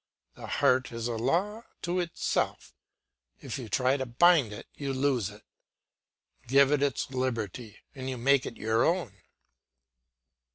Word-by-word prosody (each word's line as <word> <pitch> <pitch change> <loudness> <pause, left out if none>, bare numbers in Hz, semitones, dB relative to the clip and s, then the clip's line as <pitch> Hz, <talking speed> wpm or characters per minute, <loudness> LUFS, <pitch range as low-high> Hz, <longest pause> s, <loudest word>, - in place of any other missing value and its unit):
The - - -10
heart 130 -1 +2
is 115 0 -3
a 120 - -2
law 175 - 0 0.2
to 175 +1 0
itself; 170 -2 -2 0.7
if - - -6
you 120 -4 -7
try 130 +4 +2
to 130 -1 -3
bind 140 -1 +4
it, 105 - -8
you 140 -2 -4
lose 130 -6 +1
it; - - -14 1.0
give 135 +2 +5
it 145 -2 +2
its 140 -2 -1
liberty, 120 -4 -3 0.2
and 130 -2 -6
you 130 - -4
make 135 +2 +3
it 115 - -8
your 110 +1 +1
own. 145 - -1
130 Hz, 150 wpm, -29 LUFS, 115-145 Hz, 1.0 s, give